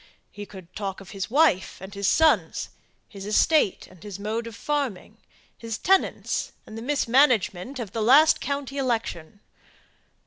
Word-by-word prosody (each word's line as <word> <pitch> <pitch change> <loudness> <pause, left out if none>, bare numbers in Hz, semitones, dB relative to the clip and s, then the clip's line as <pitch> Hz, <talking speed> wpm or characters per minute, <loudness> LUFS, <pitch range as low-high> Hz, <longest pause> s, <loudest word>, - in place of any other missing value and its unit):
He 205 0 -9
could 185 -3 -13
talk 195 -2 -4
of 195 -1 -12
his 195 0 -5
wife 275 - +2
and 190 +1 -10
his 200 -1 -2
sons, 320 -1 +2 0.4
his 200 -3 -10
estate, 215 - +2
and 185 -3 -18
his 205 -2 -8
mode 220 +3 -3
of 230 - -9
farming; 280 -10 -3 0.4
his 225 -2 -5
tenants, 385 0 0
and 215 - -11
the 225 - -6
mismanagement 250 -4 +2
of 225 -6 -6
the 225 - -3
last 280 +8 +6
county 280 -1 -4
election. 220 -7 -3
225 Hz, 150 wpm, -25 LUFS, 195-275 Hz, 0.4 s, last